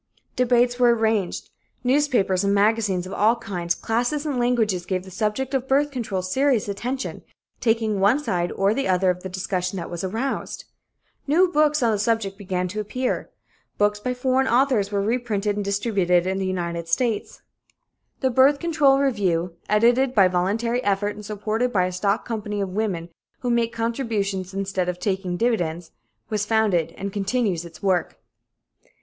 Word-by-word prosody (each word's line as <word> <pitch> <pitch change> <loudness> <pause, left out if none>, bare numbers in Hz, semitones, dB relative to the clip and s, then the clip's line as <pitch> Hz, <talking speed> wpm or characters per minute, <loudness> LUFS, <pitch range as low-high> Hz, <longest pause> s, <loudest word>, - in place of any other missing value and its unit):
Debates 245 0 +2
were 240 -1 +5
arranged. 220 -4 -1 0.3
Newspapers 245 -8 +2
and 200 0 +2
magazines 205 -3 +2
of 185 - -7
all 220 +3 +3
kinds, 180 -7 -3
classes 245 +6 -1
and 280 -4 -1
languages 225 -7 +1
gave 185 -1 -1
the 190 - -12
subject 220 +7 -2
of 265 -1 -1
birth 285 +2 +2
control 220 -8 -3
serious 255 +4 +1
attention, 245 +7 -4 0.4
taking 225 -3 +1
one 205 +7 +4
side 180 -12 -1
or 195 +2 +2
the 275 +3 -1
other 185 0 +3
of 180 0 -6
the 190 - -6
discussion 185 0 -2
that 170 -1 -6
was 175 0 -5
aroused. 225 +8 -3 0.6
New 340 +6 +4
books 300 -3 +3
on 230 - +3
the 210 - 0
subject 215 -2 0
began 185 -3 -2
to 205 +4 -5
appear. 250 +5 -2 0.5
Books 205 0 +2
by 250 +4 -2
foreign 260 +1 +1
authors 240 -5 +2
were 200 -1 0
reprinted 215 -3 -1
and 205 - -2
distributed 195 -3 +1
in 190 +1 -1
the 190 - -1
United 170 -2 -3
States. 225 +5 -1 0.8
The 260 -1 +2
Birth 265 +4 +5
Control 300 -4 +3
Review, 190 -11 0 0.2
edited 240 +5 +3
by 195 -3 +6
voluntary 220 +7 0
effort 205 +1 0
and 210 +1 -10
supported 215 +4 -2
by 185 -5 +2
a 185 - -2
stock 200 +4 0
company 210 -3 -3
of 195 -1 -1
women 185 -4 -2 0.3
who 245 - -1
make 235 -1 +1
contributions 225 -5 -2
instead 195 -2 -2
of 180 - -3
taking 190 -3 -2
dividends, 175 -7 -1 0.4
was 210 -2 -1
founded 210 -7 +1
and 195 0 -5
continues 200 -4 -1
its 165 0 -13
work. 185 -3 0
210 Hz, 165 wpm, -23 LUFS, 190-245 Hz, 0.8 s, by